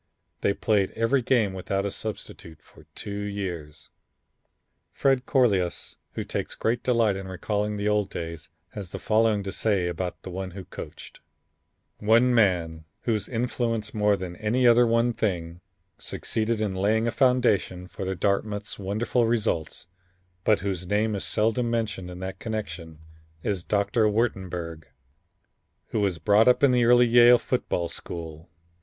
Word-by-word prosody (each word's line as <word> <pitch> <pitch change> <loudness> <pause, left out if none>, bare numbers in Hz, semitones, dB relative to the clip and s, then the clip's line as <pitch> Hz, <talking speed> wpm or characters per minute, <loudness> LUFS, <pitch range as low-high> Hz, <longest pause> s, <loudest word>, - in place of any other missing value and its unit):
They 100 - +1
played 100 -4 +1
every 115 +4 +2
game 115 -5 +2
without 95 +1 -2
a 100 - -2
substitute 85 -7 -7
for 75 - -19
two 100 -1 -5
years. 95 -7 -5 1.0
Fred 135 -1 +1
Crolius, 100 -10 +1 0.2
who - - -3
takes - - -4
great 120 +2 0
delight 115 -5 +2
in 95 0 -6
recalling 105 +3 -2
the 100 +1 -1
old 105 -2 +1
days, 85 -2 -6 0.2
has 100 -3 -7
the - - -6
following 110 -2 +2
to 95 - -4
say 100 -5 0
about 90 +1 -3
one 95 0 -5
who 95 - -7
coached: - - -10 0.8
"One 115 +4 +4
man, 85 -8 +2 0.2
whose 110 -4 -1
influence 115 -2 -2
more 105 -1 +3
than 90 -2 -6
any 115 +4 +1
other 120 0 +6
one 115 +1 +2
thing, 85 -6 -2 0.4
succeeded 110 0 -2
in 105 -3 -1
laying 110 +4 +1
a - - +1
foundation 120 -9 +2
for 95 +1 -5
Dartmouth's 105 +2 -1
wonderful 110 +4 0
results, 110 -11 -1 0.6
but 105 -2 +3
whose 95 -2 -3
name 105 +3 +1
is 100 - -3
seldom 115 +3 +1
mentioned 110 -6 -2
in 90 - -8
that 95 0 -5
connection 85 -8 -5 0.5
is 95 -4 -2
Doctor 105 +3 +2
Wurtenberg, 90 -7 -2 1.0
who 110 - -1
was 100 -4 +1
brought 105 +6 +4
up 125 +3 +4
in 140 - +6
the 125 -1 +3
early 120 +1 +6
Yale 120 +1 +7
football 105 -9 -1
school. 80 -1 -7
105 Hz, 150 wpm, -26 LUFS, 95-115 Hz, 1.0 s, Yale